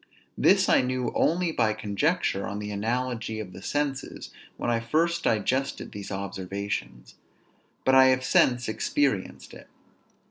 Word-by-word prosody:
This - - +4
I - - +5
knew 130 0 -2
only 170 +1 +1
by 110 -8 +1
conjecture 110 - -1
on 100 - -4
the 105 0 -5
analogy 115 +1 -2
of 95 -4 -7
the 95 - -10
senses 145 0 -3 0.3
when 120 - -1
I 115 - +1
first 165 +9 0
digested 130 +6 0
these 100 -1 -8
observations; 100 - -5 0.7
but 130 - +4
I 130 0 +8
have 130 0 +3
since 125 -1 +3
experienced 105 - -1
it. - - -13
115 Hz, 140 wpm, -26 LUFS, 100-130 Hz, 0.7 s, I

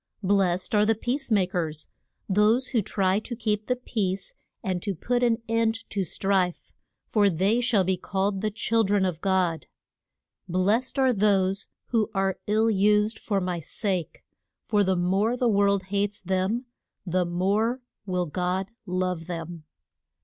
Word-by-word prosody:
Blest 190 -1 +1
are 210 -1 +5
the 225 +1 +3
peace 255 +5 -2
ma 205 -5 +3
kers 165 -5 -3 0.4
those 215 +6 +3
who 235 -5 +2
try 190 0 +1
to 240 +2 -6
keep 215 -2 -2
the 250 - +2
peace 210 - -3 0.3
and 185 -2 -1
to 200 0 -3
put 245 +9 -1
an 235 -1 +2
end 225 0 0
to 200 -2 0
strife 185 0 0 0.3
for 205 -2 +3
they 195 +7 +2
shall 230 -5 +3
be 185 0 0
called 195 +1 -1
the 215 - 0
chil 225 +2 +1
dren 200 -1 +2
of 175 -3 -3
God. 185 -4 +1 0.8
Blest 205 +10 +1
are 260 -2 +4
those 195 -2 +2 0.2
who 225 -3 +1
are 195 -1 0
ill 220 +2 +3
used 210 +2 +2
for 200 -3 -1
my 180 -2 -2
sake, 185 +1 -3 0.4
for 210 -2 +2
the 190 -1 +2
more 195 +7 +1
the 245 - +1
world 200 -2 +3
hates 205 +1 0
them 190 +6 -1 0.4
the 180 0 +1
more 200 +8 0 0.3
will 180 -1 0
God 180 +5 -2 0.2
love 180 -2 -2
them. 170 -2 -6
200 Hz, 155 wpm, -26 LUFS, 185-220 Hz, 0.8 s, are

